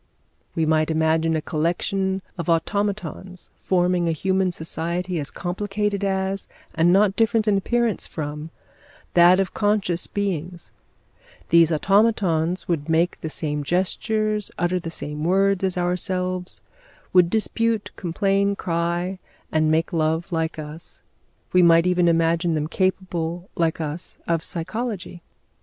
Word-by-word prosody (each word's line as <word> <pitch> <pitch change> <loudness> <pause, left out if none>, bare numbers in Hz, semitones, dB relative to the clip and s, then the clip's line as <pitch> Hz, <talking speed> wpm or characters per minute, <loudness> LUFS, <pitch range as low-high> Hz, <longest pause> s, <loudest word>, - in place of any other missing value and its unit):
We 160 - +1
might 155 0 +2
imagine 160 0 +2
a 155 - -2
collection 190 +4 -1
of 170 -2 -4
automatons 185 +1 -2
forming 180 -2 +1
a - - +1
human 190 +3 +1
society 170 +2 -3
as 145 - -2
complicated 200 +2 -2
as, 190 0 -1 0.3
and 165 +2 +3
not 195 +1 +4
different 225 -1 +2
in 210 - +4
appearance 235 +2 0
from, 150 0 -5 0.6
that 175 +2 +6
of 195 - -1
conscious 205 -5 0
beings; 180 -4 -3 0.8
these 165 0 +5
automatons 185 -2 +2
would 165 -3 -2
make 165 +2 +1
the 160 - -4
same 150 -1 -3
gestures, 210 +5 0
utter 175 +2 0
the 165 - -6
same 150 -2 -5
words 195 +2 +2
as 185 -1 0
ourselves, 180 +1 -2 0.5
would 180 -2 +6
dispute, 225 +1 0
complain, 195 +3 0
cry, 175 +1 -2 0.3
and 155 0 +2
make 160 +2 +1
love 160 +1 0
like 165 -1 -1
us; 155 +2 -7 0.5
we 180 - +6
might 170 -1 +6
even 180 -1 +3
imagine 165 0 +2
them 150 -1 -1
capable, 180 -1 -2
like 165 -1 0
us, 155 +2 -2
of 165 -1 +1
psychology. 185 0 -4
175 Hz, 130 wpm, -23 LUFS, 165-195 Hz, 0.8 s, that